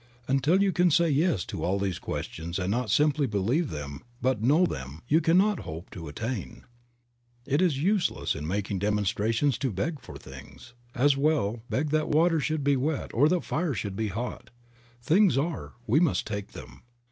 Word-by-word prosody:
Until 145 +9 +3
you 195 - +2
can 180 0 +3
say 165 +1 +3
yes 145 - +1
to - - -5
all 95 +2 +1
these 95 -3 -2
questions 85 +2 -5
and 95 0 -1
not 120 +1 -1
simply 145 +4 +3
believe 115 - 0
them 70 -2 -6 0.2
but 125 -3 0
know 150 +10 +4
them, 65 - -6
you 155 +5 +4
can 165 +2 +3
not 205 +1 +3
hope 80 +3 -8
to 85 -4 -8
attain. 115 - -5 0.8
It 145 +4 +1
is 170 -7 +2
useless 195 -1 +1
in 75 - -5
making 100 +2 -2
a - - -3
demonstration 105 +6 +1
to 130 +1 -2
beg 140 - -2
for - - -10
things; 65 - -13 0.2
as 140 +3 +4
well 135 -7 +1
beg 145 +2 -1
that 155 0 +1
water 165 +2 +3
should 155 0 -1
be 140 0 +3
wet 140 +3 -2
or 145 +6 +4
that 180 0 +1
fire 160 -3 -1
should 100 -1 -4
be 110 +2 -1
hot. 115 +5 -5 0.5
Things 170 - +4
are, 155 +3 -2
we 120 +7 +3
must 170 -4 +1
take 100 -2 -5
them. 65 - -11
130 Hz, 190 wpm, -27 LUFS, 100-155 Hz, 0.8 s, know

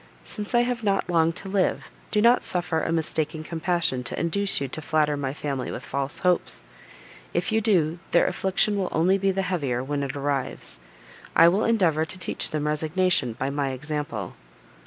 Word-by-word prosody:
Since 210 +2 -3
I 240 - +6
have 240 -1 -1
not 195 -3 +1
long 165 -1 +4
to 195 - -7
live, 195 -1 +1 0.2
do 210 -1 +2
not 240 +2 +5
suffer 175 -3 -1
a - - -1
mistaken 160 -1 -1
compassion 165 -5 -1
to - - -2
induce 200 +4 +1
you 140 - -2
to 145 +4 -5
flatter 150 -1 +1
my 140 -2 -2
family 140 -2 -3
with - - -5
false 140 0 -2
hopes. 180 -1 +1 0.7
If - - 0
you 220 0 +2
do, 175 -6 +2
their - - +4
affliction 195 +2 +1
will 190 -2 -1
only 185 +5 +3
be 195 0 +2
the 195 0 0
heavier 140 -10 -1
when 145 +1 -2
it 140 0 -3
arrives: 140 - -2 0.6
I 165 - +8
will 195 +5 +1
endeavour 180 -9 +3
to 160 +4 -4
teach 185 - -2
them 150 -1 -2
resignation 155 -3 +1
by 135 +4 -2
my 140 -1 -1
example." 145 - -4
160 Hz, 185 wpm, -25 LUFS, 145-190 Hz, 0.7 s, I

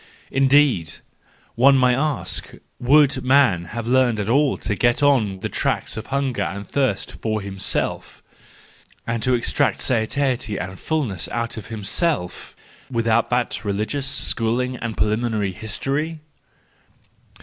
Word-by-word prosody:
Indeed 135 - +3 0.6
!—one 135 +3 +5
may 125 -1 +4
ask—would 140 -1 0
man 130 -10 +3
have 115 +6 -6
learned 125 -2 +2
at 100 - -2
all 140 +4 +2
to 105 - -2
get 120 +6 +1
on 110 -10 +2
the - - -2
tracks - - -1
of 110 - -6
hunger 135 -2 -1
and 100 +1 -3
thirst 130 -6 -1
for 110 -1 -3
himself, 95 -10 -3 0.8
and 115 -1 -2
to 125 +2 +2
extract 120 - +1
satiety 120 -2 0
and 95 0 -6
fullness 130 - -2
out 115 0 -3
of 110 -2 -8
himself, 110 - -2 0.3
without 115 -2 +1
that 125 -1 -1
religious 110 +7 -2
schooling 125 -1 0
and 120 -3 -5
preliminary 110 -2 0
history 135 - -3
120 Hz, 125 wpm, -22 LUFS, 105-135 Hz, 0.8 s, one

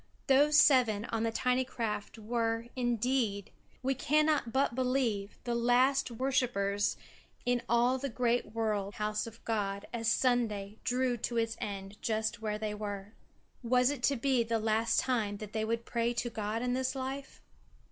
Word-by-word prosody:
Those 290 +2 +5
seven 240 -8 +5
on 225 - 0
the 230 0 0
tiny 250 +2 +1
craft 225 -4 -4
were, 230 +1 -1
indeed, 240 -4 0 0.3
we 265 +1 +2
cannot 300 -1 +2
but 265 0 +1
believe, 250 -5 0
the 240 - -2
last 250 +3 +3
worshippers 235 -6 0 0.5
in 245 -1 +2
all 245 +2 +3
the 275 +1 -3
great 240 -2 0
world 210 -3 -1
house 210 +1 -2
of 230 0 -12
God 200 -3 -1
as 230 -1 -2
Sunday 220 -5 +1
drew 250 0 +1
to 235 +1 -3
its 225 0 0
end 200 0 -6
just 220 0 -1
where 210 -1 -2
they 215 -1 -3
were. 205 -1 -6 0.5
Was 250 +2 +3
it 285 -4 -5
to 280 - +2
be 260 0 +2
the 230 0 0
last 220 +1 +2
time 220 -6 0
that 210 0 -8
they 220 0 -1
would 230 +1 -2
pray 235 0 0
to 240 0 -2
God 215 +1 -2
in 250 0 0
this 260 +1 -1
life? 270 +1 -5
230 Hz, 165 wpm, -31 LUFS, 215-255 Hz, 0.5 s, Those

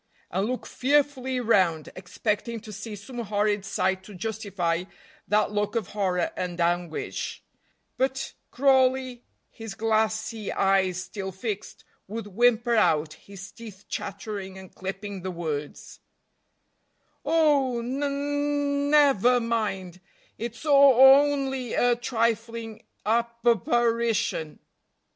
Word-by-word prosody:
and 190 +4 0
look 255 +1 -3
fearfully 265 -2 +1
round, 185 -9 +2
expecting 210 +5 -3
to 215 -1 -10
see 215 +1 -7
some 240 +5 -9
horrid 210 -2 0
sight 190 -2 -1
to 205 0 -12
justify 185 -4 -2 0.4
that 210 0 +2
look 210 +2 -1
of 220 -5 -1
horror 185 -4 0
and 180 -1 -4
anguish; 175 -1 -2 0.5
but 265 +1 -1 0.2
Crawley, 260 -2 +2 0.3
his 225 -3 -8
glassy 220 -1 0
eyes 190 -2 +2
still 190 0 -6
fixed, 205 +2 -6 0.2
would 220 +3 -5
whimper 235 +3 +2
out, 160 -8 +2
his 200 0 -12
teeth 215 -4 -12
chattering, 195 -1 -5
and 190 -1 -12
clipping 195 +1 -6
the 185 - -4
words: 155 -5 -5 1.2
"Oh, 285 -7 +2
ne 270 +4 -2
ne 285 0 -1
never 270 -5 +5
mind, 205 -6 -2 0.3
it's 235 +4 -7
o 300 - +1
o 270 0 +8
only 265 -4 -2
a 245 0 +3
trifling 230 -2 -2 0.2
ap 235 +1 0
parition!" 230 -6 +1
220 Hz, 115 wpm, -26 LUFS, 195-250 Hz, 1.2 s, o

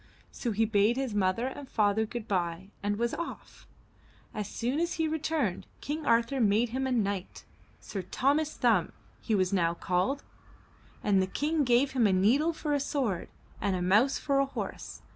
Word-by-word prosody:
So 240 - -3
he 220 +2 +2
bade 215 +2 +2
his 265 -4 -2
mother 200 +3 +1
and 265 +1 -6
father 215 0 +2
good 235 -1 -6
bye 180 -1 -2
and 205 0 -1
was 235 +1 0
off. 340 +2 -7 0.7
As 210 -2 -3
soon 250 +6 -2
as 340 +1 0
he 320 -1 0
returned, 305 - -1
King 305 +2 -4
Arthur 235 +3 +2
made 220 +2 +3
him 265 +3 -2
a - - -2
knight. 200 -5 -2 0.3
Sir 195 - -5
Thomas 285 - 0
Thumb 220 -9 +2 0.3
he 220 - 0
was 185 -1 +1
now 170 -3 +2
called, 185 +12 0 0.8
and 195 -2 +3
the 190 - 0
King 300 +9 0
gave 250 +2 +3
him 245 -5 +3
a 195 - +2
needle 245 - +3
for 305 -2 -3
a 285 - +2
sword 260 - -2 0.3
and 200 -2 +1
a 180 - -2
mouse 215 +10 +4
for 275 -1 +1
a 275 - +3
horse. - - -6
230 Hz, 180 wpm, -29 LUFS, 200-275 Hz, 0.8 s, mouse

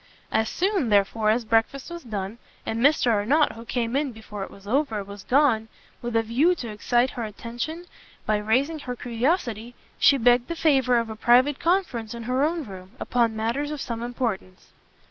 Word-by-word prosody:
As 220 0 +1
soon, 375 - 0
therefore, 210 +1 +2
as 230 +2 +1
breakfast 230 +7 0
was 345 0 -6
done, 215 -3 -5 0.3
and 225 - -2
Mr 275 -1 +4
Arnott, 255 +9 +3
who 230 - -10
came 235 0 -2
in 280 -1 0
before 215 -3 -8
it - - -7
was 195 - -15
over, 225 -2 0
was 200 0 -10
gone, 250 -5 +3 0.3
with 240 -1 -4
a 225 - +3
view 270 +11 +2
to 240 -8 -6
excite 240 +4 +1
her 240 - -5
attention 240 - -5 0.4
by 215 - +2
raising 260 +10 0
her 250 -3 -5
curiosity, 240 - -2 0.2
she 280 - +6
begged 245 0 +4
the 335 - -4
favour 270 -6 +3
of 230 -1 -1
a - - -6
private 250 +5 +4
conference 320 - 0
in 235 - -7
her 255 +3 0
own 325 +1 0
room, 190 -3 -11
upon 235 -2 +1
matters 235 +7 -1
of 300 -1 -5
some 235 -3 -4
importance. 235 -6 -4
240 Hz, 185 wpm, -25 LUFS, 220-275 Hz, 0.4 s, she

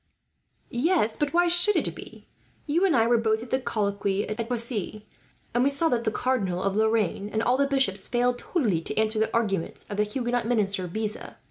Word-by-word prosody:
"Yes, 245 - +1
but 295 -1 -1
why 350 +1 +3
should 350 +4 +5
it - - 0
be? - - -12 0.4
You 330 +5 +2
and 350 -6 +2
I 225 -2 +4
were 235 0 +3
both 220 0 0
at 240 - -12
the 260 - +2
colloquy 200 -4 -1
at 220 +2 -4
Poissy, 225 -3 -2 0.5
and 240 +1 +2
we 275 - +4
saw 280 +4 +1
that 235 -1 -1
the 220 - +1
Cardinal 200 -9 -1
of 195 0 0
Lorraine, 215 -2 +1
and 220 +1 -1
all 245 +2 +2
the 280 +1 +2
bishops, 265 -9 0
failed 245 0 0
totally 220 - 0
to - - -4
answer 220 0 +1
the 220 - 0
arguments 205 -7 -2
of 205 - -4
the 210 - +3
Huguenot 240 +2 -2
minister 200 -6 +1
Beza. 215 +4 -5
230 Hz, 205 wpm, -26 LUFS, 210-255 Hz, 0.5 s, should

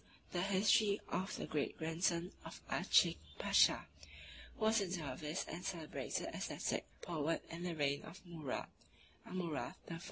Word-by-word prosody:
e. - - -28 0.2
the 175 - 0
History 200 +2 +4
of 190 +1 -1
the - - -3
Great 150 -2 -1
Grandson 170 +2 +1
of - - -8
Aaschik - - +5 0.2
Pasha, - - +5 0.7
who 220 - 0
was 220 0 +5
a 195 - 0
dervis 155 -2 -3
and 175 - -5
celebrated 170 -5 -2
ascetic - - -2 0.2
poet 165 -1 -1
in 165 +1 -5
the 175 -1 -2
reign 140 -2 +1
of 170 +4 -10
Murad 160 -6 -3 0.6
(Amurath) 175 -5 -2 0.2
I. 165 - -4
170 Hz, 150 wpm, -38 LUFS, 155-185 Hz, 0.7 s, Aaschik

